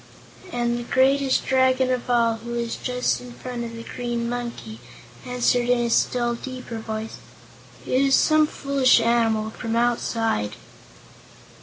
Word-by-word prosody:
And 240 -2 -1
the - - -5
greatest 265 +2 +2
Dragon 260 0 +2
of 250 0 -2
all, 230 -2 +2
who 235 +2 -7
was 235 -1 -2
just 250 0 -1
in 245 -1 -10
front 245 -1 -6
of 230 0 -7
the 230 - -8
Green 240 -1 -3
Monkey, 235 - -5 0.5
answered 245 0 +1
in 245 - +4
a 240 -1 0
still 240 0 +1
deeper 250 -1 -7
voice: 220 0 -5 0.7
"It 255 - +1
is 275 -1 +4
some 310 -1 +4
foolish 275 -4 +3
animal 225 -2 +1
from 225 +1 -4
Outside." 230 - 0
240 Hz, 145 wpm, -23 LUFS, 230-255 Hz, 0.7 s, in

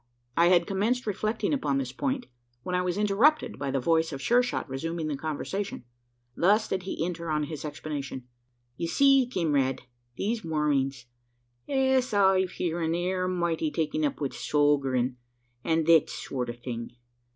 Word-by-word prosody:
I 170 +1 +5
had 175 -1 +5
commenced 220 +7 0
reflecting 215 +6 -1
upon 145 - 0
this 130 -2 -2
point, 260 - -2 0.4
when 180 - -4
I 180 - +2
was 180 +1 -1
interrupted 225 +6 +2
by 140 - -2
the 135 0 0
voice 160 +5 +2
of 135 - -5
Sure 240 - +4
shot 250 -7 -3
resuming 160 +5 -3
the 145 - -1
conversation. 160 +4 -4 0.5
Thus 210 +5 +3
did 190 - -1
he 180 -3 -3
enter 170 -1 -4
on 150 -1 +1
his 150 0 -6
explanation: 145 -4 -5 0.5
"Ye 170 - -2
see, 275 +6 +4
kimrade, 145 - +1 0.4
these 220 +1 -1
Mormings, 140 -5 0 0.6
es 265 -4 +2
I've 190 -2 +3
heern, 165 -1 -1
air 185 +1 -1
mighty 170 -3 0
taken 155 0 -1
up 145 - -1
wi' 140 -3 -1
sogerin', 135 -5 +1 0.5
an' 160 -1 +1
thet 165 -2 +5
sort 125 -2 -4
o' - - -3
thing. 120 -1 -6
165 Hz, 160 wpm, -28 LUFS, 145-195 Hz, 0.6 s, I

